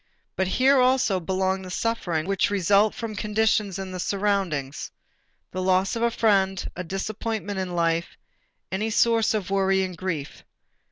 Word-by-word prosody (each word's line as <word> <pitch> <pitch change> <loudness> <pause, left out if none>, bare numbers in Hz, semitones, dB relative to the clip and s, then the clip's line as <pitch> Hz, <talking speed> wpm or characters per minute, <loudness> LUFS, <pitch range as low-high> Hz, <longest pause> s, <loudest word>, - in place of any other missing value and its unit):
But 190 - 0
here 265 +7 +4
also 255 -6 +3
belongs 190 +2 -1
the 185 - -8
suffering 180 -6 -1
which 195 0 +1
results 200 +2 +3
from 225 -2 -5
conditions 210 -1 +1
in 190 -1 -5
the 185 - -5
surroundings, 190 -9 -1 0.6
the 185 - -3
loss 185 +2 +2
of 230 - -3
a 235 - +3
friend, 195 -5 +1
a 180 - -4
disappointment 205 +2 -3
in 180 -2 -3
life, 165 0 0 0.5
any 210 +4 -1
source 225 0 +3
of 195 -3 -3
worry 195 -1 +2
and 185 -1 -4
grief. 165 -5 -5
195 Hz, 155 wpm, -25 LUFS, 185-215 Hz, 0.6 s, here